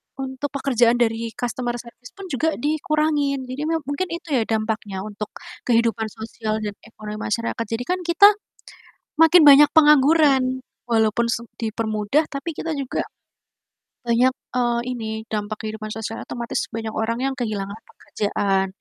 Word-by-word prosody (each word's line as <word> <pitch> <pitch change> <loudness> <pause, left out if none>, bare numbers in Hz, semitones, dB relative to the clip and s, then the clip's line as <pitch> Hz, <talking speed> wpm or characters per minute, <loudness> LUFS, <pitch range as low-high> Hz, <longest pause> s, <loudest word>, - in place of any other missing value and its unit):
untuk 265 +1 -4
pekerjaan 245 -4 +3
dari 230 -1 0
customer 245 0 -3
service 240 +1 -11
pun 390 - -10
juga 315 +5 0
dikurangin 300 -1 0
jadi 290 +4 -3
me 325 -1 -1
mungkin 285 +6 -2
itu 335 -2 -7
ya 250 -4 +3
dampaknya 215 -3 -2
untuk 210 0 -6 0.4
kehidupan 230 -2 +2
sosial 220 0 -5
dan 205 - -2 0.2
ekonomi 215 -1 -8
masyarakat 230 +1 -2
jadi 225 +2 -3
kan 360 +8 -1
kita, 350 +4 +7 0.9
makin 325 +1 +7
banyak 285 +1 +9
pengangguran, 290 -3 +5 0.3
walaupun 225 0 +2
s - - 0 0.2
dipermudah 220 +5 0
tapi 280 +4 -5
kita 325 -1 -3
juga, 275 -3 -2 1.0
banyak, 240 +2 +3 0.2
eee, 240 -1 +1
ini 225 -3 -4 0.2
dampak 210 0 -4
kehidupan 215 0 -6
sosial 225 +1 -5
otomatis 235 -1 -3
banyak 225 -1 -4
orang 230 +2 -1
yang 270 0 0
kehilangan 210 -4 -3
pekerjaan, 195 -2 -1
240 Hz, 140 wpm, -22 LUFS, 220-285 Hz, 1.0 s, banyak